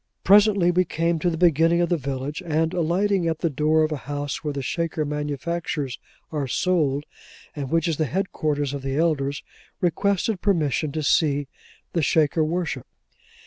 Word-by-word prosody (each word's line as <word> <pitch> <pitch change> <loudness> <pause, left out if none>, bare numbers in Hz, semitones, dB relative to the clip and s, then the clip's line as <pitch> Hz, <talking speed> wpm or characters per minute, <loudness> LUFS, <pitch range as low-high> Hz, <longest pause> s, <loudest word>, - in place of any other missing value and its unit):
Presently 200 -2 +5
we 180 +1 +3
came 165 -1 -1
to 175 - +1
the 165 - -3
beginning 165 0 +4
of 175 - +1
the 175 - +3
village, 140 +1 -4
and 160 0 0
alighting 180 +2 +1
at 160 -1 0
the 165 - +1
door 155 +3 +2
of 155 - 0
a 155 - -1
house 145 +1 -3
where 150 - -1
the 140 -1 -4
Shaker 165 +2 -2
manufactures 150 -1 -3 0.3
are 145 -4 -2
sold, 145 -2 +1 0.5
and 140 -3 -4
which 165 +1 +1
is 165 -3 -1
the 155 - +1
headquarters 150 -4 -1
of 140 - -4
the 135 +1 -3
elders, 145 -4 0 0.4
requested 195 +3 0
permission 155 -6 +1
to 155 - -2
see 145 -1 +2 0.5
the 170 - +1
Shaker 155 +1 +2
worship. 170 +2 -2
160 Hz, 170 wpm, -24 LUFS, 145-175 Hz, 0.5 s, Presently